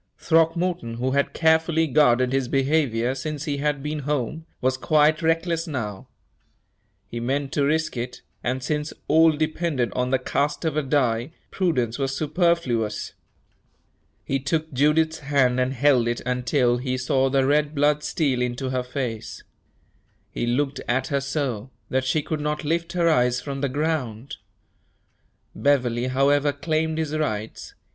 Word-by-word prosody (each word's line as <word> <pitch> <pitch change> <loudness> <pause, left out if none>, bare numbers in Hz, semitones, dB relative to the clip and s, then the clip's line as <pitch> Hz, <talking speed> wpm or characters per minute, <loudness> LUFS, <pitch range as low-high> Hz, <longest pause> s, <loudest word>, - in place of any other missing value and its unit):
Throckmorton, 165 -5 +1
who 125 +3 -1
had 140 +1 +1
carefully 160 0 +3
guarded 130 -4 +3
his 135 -2 +1
behavior 135 -3 +1
since 145 +2 -4
he 145 -3 -2
had 145 -1 -1
been 150 +1 -3
home, 150 +3 -3
was 130 +1 +1
quite 155 +3 +3
reckless 165 +1 0
now. 110 -10 -5 1.0
He 120 - -6
meant 135 +3 -1
to 145 - +1
risk 160 +1 0
it, 125 +1 -5 0.2
and 125 +1 -2
since 150 +2 -2
all 160 +1 +6
depended 155 -4 -1
on 125 0 -1
the 130 - +3
cast 145 +5 -1
of 160 -2 0
a 155 - +2
die, 130 -1 0 0.2
prudence 130 - 0
was 135 0 -1
superfluous. 150 - 0 1.1
He 135 - 0
took 155 +2 -2
Judith's 160 +4 +2
hand 140 -3 +2
and 130 +1 +1
held 135 -2 +3
it 120 0 -1
until 125 0 +1
he 130 +1 -2
saw 130 +1 +1
the 135 0 +2
red 150 +2 +1
blood 145 +1 +2
steal 135 -6 0
into 125 +2 -2
her 130 -1 0
face. 120 -4 -5 0.9
He 120 - -3
looked 135 +3 0
at 130 +5 0
her 140 -2 0
so, 135 -5 -3 0.2
that 130 0 +1
she 145 +3 +1
could 155 -2 -3
not 150 +1 -2
lift 170 +3 -1
her 175 -2 +2
eyes 125 -5 +3
from 135 0 -5
the 140 - 0
ground. 140 -3 -2 1.2
Beverley, 125 -4 +1
however, 140 +3 +2
claimed 155 +2 -1
his 155 -1 -2
rights. 110 -8 -3
140 Hz, 150 wpm, -24 LUFS, 125-155 Hz, 1.2 s, all